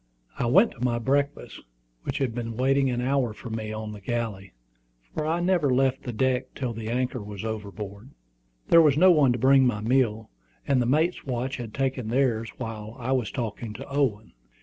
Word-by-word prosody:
I 120 - +1
went 195 - +5
to 120 - -8
my 120 -2 +1
breakfast, 140 +4 -1 0.5
which - - -2
had 130 -4 -1
been 115 -1 -5
waiting 135 +1 +2
an 120 -1 -1
hour 130 -3 +1
for 120 - -9
me 110 -1 -4
on 110 0 -5
the 105 -1 -9
galley, 105 -4 -4 0.6
for 155 - -2
I 165 +2 +1
never 175 -5 +2
left 135 +1 +2
the 125 - -5
deck 125 +2 -1
till 125 -4 -3
the 110 0 -6
anchor 125 0 -1
was 105 0 -7
overboard. 105 +1 -6 0.6
There 165 - +8
was 150 -3 +4
no 185 +3 +7
one 145 -6 +5
to - - -2
bring 130 +2 +5
my 110 -4 0
meal, 115 -2 +1 0.4
and 135 -2 +3
the 120 - 0
mate's 155 +7 +1
watch 130 0 -3
had 120 -3 -6
taken 135 -4 -1
theirs 115 -2 +1
while 110 0 -6
I 125 0 -3
was 125 -6 +1
talking 110 0 -4
to 135 +5 -9
Owen. 130 -7 -1
125 Hz, 195 wpm, -26 LUFS, 110-135 Hz, 0.6 s, There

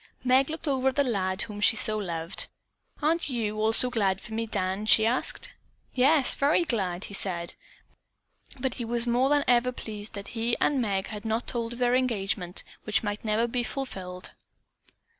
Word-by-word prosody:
Meg 260 +2 +3
looked 320 +1 -4
over 265 -2 0
at 265 - +1
the 285 - +3
lad 190 -7 -1
whom 210 -1 -8
she 220 - +5
so 215 0 +3
loved. 170 -4 -1 0.6
"Aren't 325 +1 +1
you 215 -4 -2
also 225 +3 +5
glad 195 -5 0
for 220 - -9
me, 225 +1 -2
Dan?" 195 0 -2
she 220 0 +6
asked. 240 +3 -2 0.4
"Yes, 275 +2 +6
very 295 +5 +2
glad," 190 - -2
he - - -6
said, 175 -4 -2 1.1
but 255 0 -2
he - - -2
was 235 +1 +5
more 245 +3 +2
than 290 0 +3
ever 245 0 +3
pleased 215 -3 -6
that 200 0 -7
he 230 0 -2
and 280 -3 +1
Meg 195 -4 -2
had 210 -1 -7
not 225 +1 -2
told 235 -1 -2
of - - -9
their 245 0 +1
engagement, 200 -8 -1 0.2
which 215 +1 0
might 205 0 -4
never 220 +1 +1
be 240 +1 -2
fulfilled. 190 -9 -6
225 Hz, 180 wpm, -27 LUFS, 205-250 Hz, 1.1 s, she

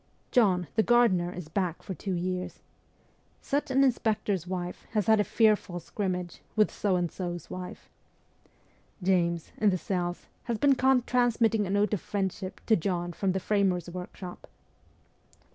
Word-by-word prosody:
' - - -39
John, 190 -7 +3
the 220 - +5
gardener, 220 -7 +3
is 180 -3 -7
back 175 0 -2
for 190 - -5
two 190 +1 -4
years.' 180 +1 -3 0.4
' - - -35 0.3
Such 285 +1 -1
an 265 +1 +4
inspector's 215 - +1
wife 180 -1 -5
has 210 -3 +1
had 220 -1 +5
a - - +4
fearful 210 -5 +2
scrimmage 180 0 -4
with 215 -1 +3
So 200 -3 0
and 175 -2 0
So's 175 -3 -5
wife.' 180 0 -7 0.6
' 200 - -24
James, 170 -3 +1
in 215 - +4
the 185 - +1
cells, 175 -1 -3 0.2
has 235 -3 -1
been 280 +5 +4
caught 260 -1 +3
transmitting 230 -4 +2
a - - -5
note 205 +2 +2
of 200 - 0
friendship 190 -2 -3
to 220 - +5
John 175 -1 -2
from 190 +2 0
the 190 - 0
framers' 185 -3 +1
workshop.' 180 0 -8
190 Hz, 165 wpm, -28 LUFS, 180-220 Hz, 0.6 s, the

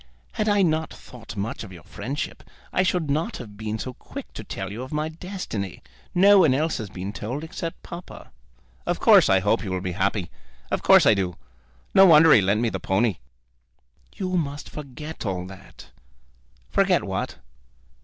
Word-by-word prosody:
Had 215 -1 -1
I 205 -1 +4
not 160 -2 0
thought 115 -4 -11
much 105 +4 -3
of 105 - -10
your 85 -2 -12
friendship, 135 +9 -5 0.3
I - - +3
should 180 -4 +1
not 155 +4 -1
have 105 -5 -10
been 110 +1 -4
so 130 +3 -5
quick - - -10
to - - -7
tell 95 0 -5
you 110 +4 -6
of 130 - -7
my 155 +1 -1
destiny. 160 - -6 0.3
No 200 +2 +7
one 155 -8 +5
else 155 +1 0
has 110 -3 -5
been 95 +2 -6
told, 125 +9 -4
except 165 0 -6
papa." 170 +1 -10 0.6
"Of - - 0
course - - +6
I 95 -1 +4
hope 105 +4 +1
you 100 - -4
will 95 0 -1
be 90 0 -3
happy. 95 0 -1 0.4
Of - - 0
course - - +6
I - - +7
do. 95 -4 -1 0.6
No 195 0 +8
wonder 160 -1 +8
he 110 - +7
lent 100 +3 +1
me 120 - +2
the 95 - -4
pony!" 95 +1 +1 1.0
"You 185 -2 -3
must 145 -3 -3
forget 150 +2 -8
all 95 -4 -2
that." 95 0 -13 0.8
"Forget - - +3
what?" - - -3
125 Hz, 185 wpm, -24 LUFS, 100-160 Hz, 1.0 s, No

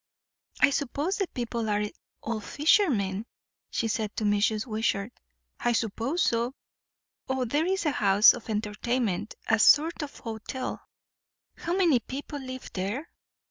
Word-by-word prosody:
"I - - +6
suppose 290 +6 -1
the 390 - 0
people 235 -4 -3
are 210 0 +1 0.4
all 225 -1 -2
fishermen?" 230 - +2 0.4
she 230 - -1
said 215 -1 -2
to - - -2
Mrs. 210 +1 +2
Wishart. 220 -1 -1 0.5
"I 240 - +1
suppose 230 - 0
so. 235 +2 0 0.7
O, 265 -1 0
there 295 +8 +1
is 380 -2 0
a 300 - +3
house 205 -3 +6
of 235 - -9
entertainment 210 -1 -1
a 225 - +3
sort 310 +9 +5
of 290 -1 -6
hotel." 225 +2 -5 0.7
"How 340 +2 -2
many 335 -10 +4
people 280 +5 -6
live 260 -1 -8
there?" 205 - -3
235 Hz, 140 wpm, -28 LUFS, 215-285 Hz, 0.7 s, I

